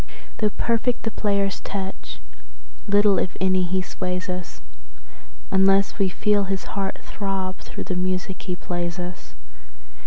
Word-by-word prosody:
Though 215 Hz, -, +3 dB
perfect 235 Hz, +3 st, +1 dB
the 225 Hz, -, -1 dB
player's 200 Hz, -2 st, +1 dB
touch, 190 Hz, -, -5 dB, 0.7 s
little, 205 Hz, -2 st, +5 dB
if 185 Hz, -, -2 dB
any, 185 Hz, -1 st, +3 dB
he 185 Hz, +1 st, 0 dB
sways 180 Hz, 0 st, -3 dB
us, 180 Hz, -1 st, -4 dB, 0.9 s
Unless 195 Hz, +2 st, +4 dB
we 195 Hz, -1 st, +4 dB
feel 205 Hz, +2 st, +2 dB
his 195 Hz, 0 st, -1 dB
heart 195 Hz, -1 st, -1 dB
throb 195 Hz, -2 st, -2 dB
through -, -, -6 dB
the 185 Hz, -, -2 dB
music 185 Hz, +1 st, -1 dB
he 180 Hz, -2 st, -2 dB
plays 175 Hz, 0 st, -2 dB
us. 180 Hz, 0 st, -6 dB
190 Hz, 135 wpm, -25 LUFS, 180-200 Hz, 0.9 s, little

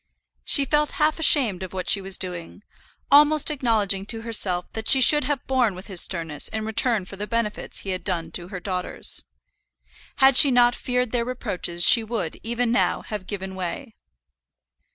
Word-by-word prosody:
She 280 Hz, -, +2 dB
felt 295 Hz, +2 st, -1 dB
half 310 Hz, +1 st, 0 dB
ashamed 255 Hz, -, +4 dB
of 185 Hz, -1 st, -8 dB
what 185 Hz, -1 st, -6 dB
she 200 Hz, -, +5 dB
was 195 Hz, 0 st, -3 dB
doing, 180 Hz, +2 st, -6 dB, 0.5 s
almost 300 Hz, +1 st, +4 dB
acknowledging 215 Hz, -8 st, -1 dB
to 225 Hz, 0 st, -4 dB
herself 190 Hz, -6 st, -2 dB
that 220 Hz, 0 st, -5 dB
she 265 Hz, -, +7 dB
should 295 Hz, +3 st, +5 dB
have 290 Hz, -3 st, -3 dB
borne 250 Hz, -7 st, 0 dB
with 185 Hz, +2 st, -11 dB
his 190 Hz, -4 st, +3 dB
sternness 165 Hz, -5 st, -3 dB
in 220 Hz, 0 st, -5 dB
return 220 Hz, -2 st, 0 dB
for 195 Hz, -, -11 dB
the 210 Hz, +2 st, -6 dB
benefits 230 Hz, -2 st, -3 dB
he 195 Hz, -, -6 dB
had 185 Hz, -1 st, -5 dB
done 175 Hz, -4 st, -3 dB
to 175 Hz, -, -6 dB
her 185 Hz, -1 st, -8 dB
daughters. 180 Hz, -1 st, -2 dB, 0.9 s
Had 265 Hz, -1 st, +4 dB
she 285 Hz, -, +8 dB
not 245 Hz, -1 st, +3 dB
feared 250 Hz, -2 st, -3 dB
their 240 Hz, -2 st, -1 dB
reproaches 180 Hz, -8 st, -2 dB
she 230 Hz, 0 st, +7 dB
would, 215 Hz, -8 st, -5 dB
even 235 Hz, +1 st, -3 dB
now, 240 Hz, -, 0 dB
have 210 Hz, -4 st, -7 dB
given 190 Hz, -2 st, -7 dB
way. 190 Hz, +7 st, -7 dB
220 Hz, 180 wpm, -22 LUFS, 185-250 Hz, 0.9 s, she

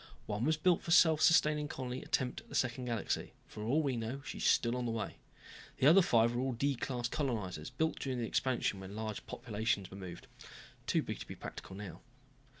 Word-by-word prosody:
One 105 Hz, +3 st, -2 dB
was 160 Hz, +1 st, +2 dB
built 175 Hz, +2 st, +3 dB
for -, -, -8 dB
self 160 Hz, -2 st, +6 dB
sustaining 150 Hz, -2 st, +4 dB
colony 130 Hz, -2 st, -5 dB
attempt 125 Hz, -1 st, -1 dB
at -, -, -23 dB
the -, -, -7 dB
second 125 Hz, 0 st, 0 dB
galaxy. 115 Hz, -4 st, -2 dB
For 105 Hz, -, -9 dB
all 135 Hz, +9 st, +2 dB
we 135 Hz, -3 st, 0 dB
know 120 Hz, +4 st, -4 dB
she -, -, -6 dB
is -, -, -2 dB
still 120 Hz, +1 st, +3 dB
on 125 Hz, -1 st, -2 dB
the -, -, -1 dB
way. 110 Hz, -2 st, -4 dB, 0.6 s
The -, -, +1 dB
other 170 Hz, +7 st, +8 dB
five 115 Hz, -7 st, +3 dB
were 120 Hz, -, 0 dB
all 130 Hz, 0 st, 0 dB
D 140 Hz, +4 st, +1 dB
class 120 Hz, -1 st, -2 dB
colonizers, 110 Hz, -, -2 dB
built 160 Hz, -1 st, -1 dB
during 130 Hz, -2 st, -2 dB
the 120 Hz, -, -1 dB
Expansion 120 Hz, -4 st, 0 dB
when 95 Hz, +1 st, -8 dB
large 110 Hz, -1 st, -4 dB
populations 110 Hz, -3 st, -2 dB
were 95 Hz, -, -8 dB
moved. 90 Hz, -3 st, -8 dB, 0.6 s
Too -, -, +2 dB
big -, -, -5 dB
to -, -, -8 dB
be -, -, -7 dB
practical 95 Hz, -, -8 dB
now. 100 Hz, -4 st, -8 dB
120 Hz, 215 wpm, -34 LUFS, 110-140 Hz, 0.6 s, other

